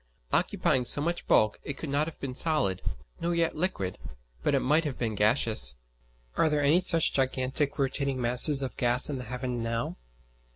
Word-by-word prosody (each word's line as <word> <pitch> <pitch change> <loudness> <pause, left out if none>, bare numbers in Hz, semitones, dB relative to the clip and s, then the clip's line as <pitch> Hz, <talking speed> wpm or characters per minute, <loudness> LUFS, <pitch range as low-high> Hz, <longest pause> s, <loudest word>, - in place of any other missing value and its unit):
Occupying 125 -2 +1
so 130 - +1
much 170 +4 -3
bulk 110 0 +2
it 145 - -6
could 155 - -6
not 145 +2 0
have 165 - -9
been 135 -2 -6
solid, 125 - -1 0.4
nor 170 +1 -2
yet 165 -1 0
liquid, 150 - -3 0.4
but - - 0
it - - 0
might 150 +5 +2
have 145 -5 -5
been 115 -3 -3
gaseous. 105 - +1 0.6
Are 160 - +2
there 150 -1 -1
any 155 +6 +3
such 165 -3 +3
gigantic 135 +2 -1
rotating 135 -1 -2
masses 125 +4 +7
of 130 - -7
gas 125 +4 +4
in 135 - -5
the 125 - -8
heaven 125 0 -5
now? 115 0 -4
135 Hz, 180 wpm, -27 LUFS, 120-150 Hz, 0.6 s, masses